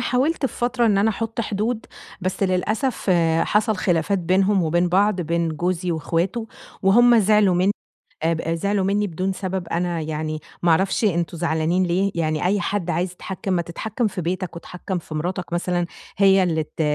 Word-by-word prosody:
حاولت 270 +4 +1
في - - -9
فترة 240 0 +1
إن 200 -2 +3
أنا 220 +2 +3
أحط 225 +1 -3
حدود، 220 +2 -2 0.3
بس 185 +2 -2
للأسف 205 +5 0 0.3
حصل 210 +1 +1
خلافات 185 +1 +1
بينهم 190 +2 +2
وبين 175 +2 +1
بعض، 195 +1 +2
بين 170 0 0
جوزي 175 +2 -1
وإخواته، 175 +8 -1 0.4
وهُم 235 +4 +6
زعلوا 210 -2 +4
من 185 +3 +3 0.5
آب 165 0 +1
أ 165 +1 -1
زعلوا 200 +3 0
مني 205 +1 +1
بدون 185 +2 -2
سبب 185 -2 -4
"أنا 175 0 -1
يعني 155 0 -3 0.2
ما 170 - +3
أعرفش 190 +6 +2
أنتم 170 -3 0
زعلانين 170 +2 +1
ليه؟" 190 +3 +1
يعني 155 -2 -1
أي 200 +2 +2
حد 190 -4 -2
عايز 180 +1 -1
يتحكم 190 +2 -5
"ما 175 -1 +1
تتحكم 220 +7 -3
في 190 -3 -3
بيتك 180 +1 -3
واتحكم 180 +2 -5
في 155 -1 -9
مراتك 175 +2 -3
مثلًا، 175 0 0 0.3
هي 195 -1 +5
اللي 160 -3 +1
ت 155 - -11
185 Hz, 175 wpm, -22 LUFS, 170-205 Hz, 0.5 s, وهُم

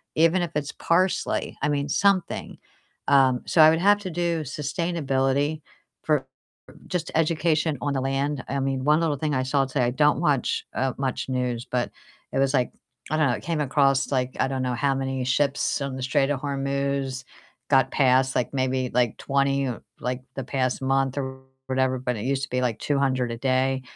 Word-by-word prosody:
Even 165 +3 +4
if 170 - -3
it's 150 -1 -2
parsley, 180 +2 0
I 150 - +1
mean 145 -1 -1
something. 195 +1 +1 0.5
Um, 130 -3 +4
so 165 - +4
I 155 - +9
would 160 - +1
have 205 +3 +5
to 185 -3 -5
do 170 -1 -1
sustainability 145 -1 -1 0.4
for - - +1 0.6
just 175 -3 -3
education 160 -1 +1
on 145 - 0
the 135 - 0
land. 135 +1 -1
I 140 - -2
mean, 135 -1 -1
one 150 +2 +4
little 160 -3 0
thing 150 0 -1
I 130 - +1
saw 135 +1 +1
today, 130 -1 0
I - - +1
don't 150 +4 +2
watch, 145 -6 0
uh, 130 0 0
much 135 -1 -2
news, 125 -1 -2
but 125 -1 -1 0.4
it - - -1
was 135 0 +2
like, 125 -2 +1 0.4
I 155 - +1
don't 155 - +3
know, 120 - +1
it - - -6
came 165 -2 -1
across 135 -1 +2
like 130 -1 0
I - - +2
don't 135 -1 -2
know 125 -1 -1
how 135 +3 +1
many 135 -1 -2
ships 140 +3 +1
on 135 -1 -4
the 130 - -6
Strait 135 +2 +1
of 140 -2 -1
Hormuz 140 -1 -2 0.5
got 135 -2 +4
past, 130 -1 +3
like 125 - -1
maybe, 130 -1 0
like 120 -2 +2
20, 140 -1 +1 0.3
like 125 +1 -3
the 135 - -3
past 130 0 -1
month 135 0 +1
or 130 -1 -5 0.3
whatever, 130 0 +1
but 125 -1 -2
it 105 - -5
used 135 +1 0
to - - -8
be 125 0 0
like 120 -3 -1
200 135 -4 0
a - - -4
day 130 +1 +1
135 Hz, 195 wpm, -25 LUFS, 130-150 Hz, 0.6 s, I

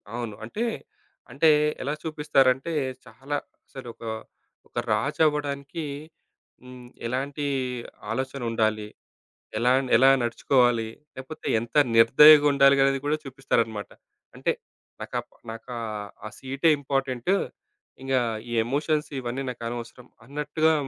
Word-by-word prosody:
అవును. 115 -4 -4
అంటే 210 - -3 0.7
అంటే 155 +4 +4 0.3
ఎలా 145 +3 -1
చూపిస్తారంటే 150 -2 +2 0.3
చాలా 135 +3 -6 0.3
అసలు 130 -3 -10
ఒక, - - -15 0.7
ఒక - - -14 0.2
రాజవ్వడానికి 145 0 0 0.8
హ్మ్. 125 -1 -12 0.2
ఎలాంటి 140 +4 -3 0.7
ఆలోచన 130 +2 -3
ఉండాలి? 110 -2 0 0.7
ఎలా 120 +3 +3 0.3
ఎలా 130 +3 +6
నడుచుకోవాలి? 120 -1 +2 0.3
లేకపోతే 130 +4 -8
ఎంత 115 +1 -9 0.2
నిర్దయగుండాలి 140 +3 +7
అనేది 135 0 +2
గూడా 150 +1 +1
చూపిస్తారనమాట. 120 -6 -1 0.5
అంటే - - +1 0.5
నా - - -3
కప్ - - -4 0.2
నాకా 115 +2 -8 0.5
ఆ - - -7
సీటే 135 +4 +1
ఇంపార్టెంటు. 135 +3 0 0.7
ఇంగా 135 -1 +1 0.3
ఈ - - -4
ఎమోషన్స్ 150 +4 0
ఇవన్నీ 125 +2 -3
నాకనవసరం 120 +1 -7 0.2
అన్నట్టుగా 150 +4 +1
135 Hz, 105 wpm, -26 LUFS, 120-145 Hz, 0.8 s, నిర్దయగుండాలి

